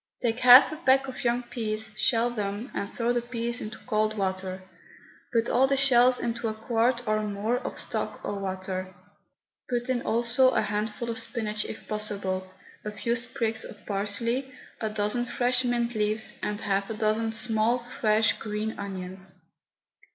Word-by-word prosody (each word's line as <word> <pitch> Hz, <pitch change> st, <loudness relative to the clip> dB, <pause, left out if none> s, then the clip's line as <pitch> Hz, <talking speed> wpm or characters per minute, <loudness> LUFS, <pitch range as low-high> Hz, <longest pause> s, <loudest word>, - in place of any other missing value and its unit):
Take 235 Hz, 0 st, +1 dB
half 255 Hz, +4 st, +9 dB
a 310 Hz, -, -5 dB
peck 270 Hz, -4 st, +3 dB
of 260 Hz, -, -6 dB
young 240 Hz, 0 st, +1 dB
peas, 220 Hz, -2 st, -2 dB
shell 235 Hz, +2 st, +2 dB
them, 210 Hz, +2 st, -4 dB
and 200 Hz, -, -3 dB
throw 240 Hz, 0 st, 0 dB
the 240 Hz, -, +1 dB
peas 235 Hz, 0 st, -2 dB
into 215 Hz, 0 st, -6 dB
cold 215 Hz, -2 st, 0 dB
water. 190 Hz, -1 st, -2 dB, 0.7 s
Put 230 Hz, -1 st, +2 dB
all 260 Hz, +2 st, +4 dB
the 275 Hz, 0 st, +1 dB
shells 255 Hz, -2 st, +5 dB
into 235 Hz, 0 st, -2 dB
a 220 Hz, -, -2 dB
quart 235 Hz, +2 st, 0 dB
or 215 Hz, 0 st, +2 dB
more 210 Hz, +4 st, -1 dB
of -, -, -6 dB
stock -, -, -3 dB
or -, -, -2 dB
water. 185 Hz, -1 st, -4 dB, 0.7 s
Put 245 Hz, 0 st, -1 dB
in 250 Hz, -2 st, +1 dB
also 240 Hz, +3 st, +3 dB
a -, -, +4 dB
handful 210 Hz, +3 st, -2 dB
of 230 Hz, -, -3 dB
spinach 215 Hz, -4 st, -2 dB
if -, -, -8 dB
possible, 195 Hz, -3 st, -1 dB, 0.3 s
a 210 Hz, -, -3 dB
few 230 Hz, +3 st, -1 dB
sprigs 230 Hz, -2 st, -2 dB
of 205 Hz, -, -11 dB
parsley, 230 Hz, +6 st, -1 dB, 0.3 s
a 220 Hz, -, -1 dB
dozen 210 Hz, +3 st, 0 dB
fresh 245 Hz, +1 st, +1 dB
mint 240 Hz, -1 st, 0 dB
leaves 215 Hz, 0 st, 0 dB
and 210 Hz, 0 st, -2 dB
half 195 Hz, -1 st, 0 dB
a 225 Hz, -, -3 dB
dozen 220 Hz, +1 st, +1 dB
small, 220 Hz, +1 st, +1 dB
fresh, 225 Hz, -3 st, +2 dB
green 215 Hz, 0 st, -3 dB
onions. 190 Hz, -1 st, -4 dB
225 Hz, 165 wpm, -27 LUFS, 210-240 Hz, 0.7 s, half